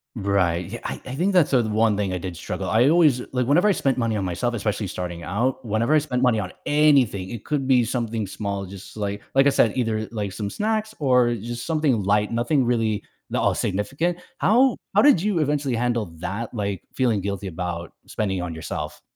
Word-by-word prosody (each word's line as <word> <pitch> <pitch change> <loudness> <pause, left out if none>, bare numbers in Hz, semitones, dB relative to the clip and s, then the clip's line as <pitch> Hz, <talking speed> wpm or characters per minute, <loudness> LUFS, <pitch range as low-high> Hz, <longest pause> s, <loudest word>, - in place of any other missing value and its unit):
Right, 95 -5 +1
yeah, 120 - -5
I - - -4
I 130 - -5
think 180 +7 +1
that's 180 -5 +3
the 125 -3 +4
one 110 0 +2
thing 100 -2 -1
I 90 - -1
did 90 0 -6
struggle 80 - -4
I 120 +5 +4
always 155 -6 +4
like, 125 -2 0
whenever 175 +9 +4
I - - +5
spent 135 -8 0
money 115 -3 0
on 100 - -2
myself, 95 +7 -1
especially 105 -2 -2
starting 85 -1 -5
out, 125 +9 -1
whenever 115 +7 +1
I - - +6
spent 130 -4 -2
money 125 -4 +3
on 90 -3 -4
anything- 140 -11 +3
it 115 -3 -7
could 145 -3 -1
be 125 -3 +4
something 115 -3 -2
small 100 0 -4
just 95 +3 -11
like 100 -1 -3
like 135 0 +5
I - - +7
said, 115 - +3
either, 110 -3 -1
like, 105 -4 -3
some 100 -1 -4
snacks 215 - -1
or 125 -4 +3
just 120 +2 -6
something 150 -9 +1
light, 105 +2 +2
nothing 120 +4 +1
really 115 -3 0 0.3
that - - -1
all - - +2
significant, 135 - -1 0.2
how 245 +5 +4 0.2
how - - +5
did 285 - +5
you 200 -3 0
eventually 145 -4 0
handle 120 -2 0
that, 100 +8 -4
like, 100 -4 -3
feeling 120 -6 +1
guilty 100 0 -4
about 85 -1 -5
spending 95 -3 -2
it - - -2
on 90 -2 -4
yourself? 75 -1 -6
115 Hz, 215 wpm, -23 LUFS, 100-135 Hz, 0.3 s, I